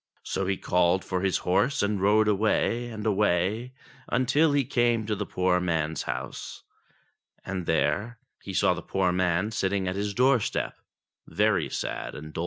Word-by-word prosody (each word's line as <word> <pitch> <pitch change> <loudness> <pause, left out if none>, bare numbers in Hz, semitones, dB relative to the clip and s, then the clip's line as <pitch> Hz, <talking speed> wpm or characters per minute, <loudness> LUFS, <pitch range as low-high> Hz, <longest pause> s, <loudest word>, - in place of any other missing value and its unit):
So 95 - -2
he 95 -1 0
called 90 +1 +1
for 90 -1 -2
his 95 -1 +1
horse 105 +8 +2
and 100 -1 0
rode 105 +2 +4
away, 110 +3 +1
and 110 -2 -7
away, 105 +3 +1 0.4
until 140 +6 +3
he 140 -2 +2
came 120 -2 +1
to 105 0 -1
the - - -4
poor 90 0 +1
man's 80 -3 -1
house, - - -6 0.8
and 95 -3 -4
there 80 +9 0 0.2
he - - -7
found - - +2
the - - -8
poor 95 -2 0
man 90 +3 0
sitting 95 -2 -1
at 90 - -2
his 100 0 -3
doorstep 125 -3 +1 0.5
very - - +1
sad - - -4
and 75 +1 -9
doleful. - - -5
100 Hz, 165 wpm, -27 LUFS, 90-110 Hz, 0.8 s, rode